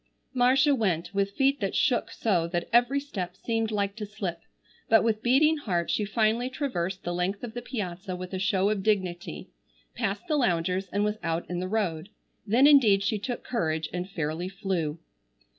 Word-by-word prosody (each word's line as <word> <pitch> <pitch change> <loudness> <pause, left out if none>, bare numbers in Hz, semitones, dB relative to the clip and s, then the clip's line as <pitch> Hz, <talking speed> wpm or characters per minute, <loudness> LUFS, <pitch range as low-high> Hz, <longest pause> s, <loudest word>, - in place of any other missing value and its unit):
Marcia 265 +3 +4
went 190 - 0
with 200 0 0
feet 275 +3 +2
that 195 -3 -2
shook 250 -5 +2
so 180 -7 0
that 175 0 -2
every 245 +4 +4
step 190 -11 -5
seemed 225 +2 -1
like 200 -2 -1
to 220 - -6
slip, 195 -5 -5 0.5
but 225 0 +6
with 220 -1 +1
beating 300 +7 +4
heart 180 - -1
she 210 - 0
finally 225 +3 +1
traversed 195 - -3
the 175 - -2
length 180 +4 -2
of 230 -2 -5
the 240 - -5
piazza 190 -6 -5
with 180 +1 -7
a 190 - -2
show 195 +1 +2
of 210 -2 -1
dignity, 180 - -2 0.4
passed 195 - -2
the 305 -2 +1
loungers, 185 - +1
and 205 +2 +1
was 210 +1 -1
out 165 0 -2
in 175 - -2
the 185 - -2
road. 185 -5 -1 0.4
Then 240 +7 +5
indeed 230 -10 +6
she 210 +1 0
took 245 +3 -4
courage 160 -9 -1
and 180 +1 -3
fairly 165 0 -3
flew. 185 -6 -2
200 Hz, 185 wpm, -27 LUFS, 180-235 Hz, 0.5 s, but